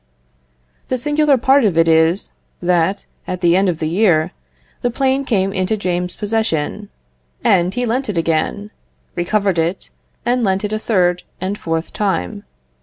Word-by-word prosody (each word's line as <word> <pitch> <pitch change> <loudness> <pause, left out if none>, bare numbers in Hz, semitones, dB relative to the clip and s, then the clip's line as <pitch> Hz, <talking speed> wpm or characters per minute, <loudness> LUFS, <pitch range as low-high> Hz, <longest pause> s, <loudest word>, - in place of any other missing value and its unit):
The 255 - -1
singular 295 +2 +2
part 265 +2 +4
of 195 -7 +1
it 165 0 +4
is, 160 +3 +3 0.3
that, 180 +2 +1 0.2
at 185 -1 -4
the 170 -1 +4
end 190 0 +3
of 170 - -1
the 155 - -2
year, 170 -3 +2 0.5
the 245 - +1
plane 265 +2 +1
came 195 -5 0
into 190 +3 0
James's 180 -2 -2
possession, 210 -3 -2 0.5
and 180 -1 +3
he 245 +4 -2
lent 245 +2 -1
it 200 - -2
again; 165 +6 -1 0.4
recovered 190 0 0
it, 170 +4 -2 0.3
and 245 0 +1
lent 195 0 +1
it 210 - -3
a 215 - -1
third 180 -5 +1 0.2
and 190 +2 -2
fourth 165 -4 -3
time. 100 - -2
190 Hz, 160 wpm, -18 LUFS, 170-220 Hz, 0.5 s, part